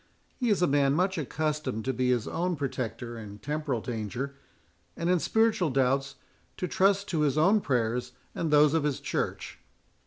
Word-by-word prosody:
He 245 -3 -1
is 200 -4 +2
a - - +4
man 140 -1 +3
much 185 +2 +1
accustomed 150 -5 -2
to 130 - 0
be 125 0 0
his 120 -3 +1
own 180 +1 -1
protector 120 -4 -4
in 105 -2 -9
temporal 145 -2 -2
danger, 120 +4 -4 0.6
and 170 +1 0
in 180 - +3
spiritual 220 -4 +2
doubts 135 +1 +1 0.4
to 180 - -2
trust 200 +2 +2
to 165 - 0
his 150 -1 +2
own 195 +7 +4
prayers 125 -4 -1 0.2
and 165 - -2
those 150 0 +5
of 160 - +3
his 145 -3 -1
Church." - - -3
145 Hz, 175 wpm, -28 LUFS, 125-170 Hz, 0.6 s, those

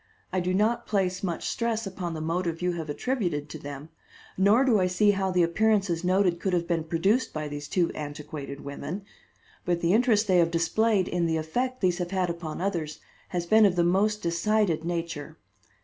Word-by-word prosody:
I 185 - +2
do 180 0 -1
not 225 +5 +1
place 190 -3 0
much 175 -4 -3
stress 230 -1 -1
upon 180 -3 -4
the 155 - -4
motive 165 +1 -1
you 180 - +2
have 165 -3 -5
attributed 170 - -2
to 155 - -7
them, 145 +1 -8 0.5
nor 205 +7 +4
do 230 -6 +4
I 185 - +2
see 195 +3 +3
how 195 -1 -1
the 180 -1 +3
appearances 195 -1 +1
noted 180 -1 +2
could 190 0 -1
have 170 -1 0
been 165 -2 0
produced 195 +10 +1
by 155 -1 -3
these 145 0 -6
two 175 +1 +1
antiquated 145 -1 -7
women; 155 +7 -6 0.6
but 175 -1 0
the 170 +2 +2
interest 225 -2 +3
they 185 -2 +4
have 165 -1 +4
displayed 185 +4 +1
in 175 -1 0
the 160 0 0
effect 250 +12 -2
these 180 -1 +1
have 175 -1 -2
had 185 -2 0
upon 170 -1 -6
others 170 -6 -2 0.3
has 175 -1 -3
been 220 +5 +5
of 195 -3 +4
the 175 - +3
most 205 +5 +1
decided 170 0 +1
nature. 165 -3 -4
180 Hz, 195 wpm, -27 LUFS, 165-200 Hz, 0.6 s, been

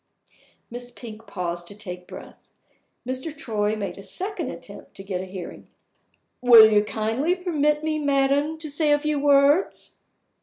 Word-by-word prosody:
Miss 245 +1 -7
Pink 225 -2 -11
paused 175 -2 -4
to 205 - -9
take 180 -3 -8
breath. - - -12 0.6
Mr. 260 +4 -4
Troy 215 -7 -1
made 200 -2 -5
a - - -8
second 370 - -4
attempt - - -11
to 195 - -9
get 190 -2 -4
a - - -6
hearing. 185 -2 -9 0.7
"Will 235 -3 +9
you 210 0 +4
kindly 225 - -1
permit 300 -5 0
me, 310 -1 -1
madam, 285 +2 +1
to 315 -1 -6
say 295 +1 +1
a 290 - +5
few 300 0 -1
words?" 285 +4 +2
255 Hz, 155 wpm, -24 LUFS, 210-300 Hz, 0.7 s, Will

